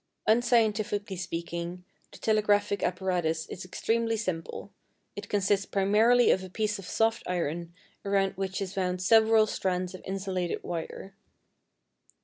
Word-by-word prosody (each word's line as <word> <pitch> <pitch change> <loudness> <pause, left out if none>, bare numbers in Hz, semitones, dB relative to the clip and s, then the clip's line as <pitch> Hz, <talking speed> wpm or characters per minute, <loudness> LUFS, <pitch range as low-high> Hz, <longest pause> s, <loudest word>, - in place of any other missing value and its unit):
Unscientifically 215 -3 +2
speaking, 170 0 -5 0.3
the - - -12
telegraphic 205 -2 +2
apparatus 175 -3 0
is 185 - -7
extremely 225 +4 0
simple: 185 -1 -4 0.4
it 205 0 -7
consists 200 -1 +1
primarily 220 +5 +4
of 190 - +1
a 185 - -8
piece 210 +1 -1
of 185 - -9
soft 225 +3 +1
iron 170 -1 -2 0.3
around 195 -1 +1
which 190 0 -3
is 195 0 -7
wound 180 -1 -1
several 220 +3 +5
strands 185 -3 -2
of 185 - -9
insulated 190 -2 -3
wire. 175 +3 -6
195 Hz, 130 wpm, -28 LUFS, 180-215 Hz, 0.4 s, several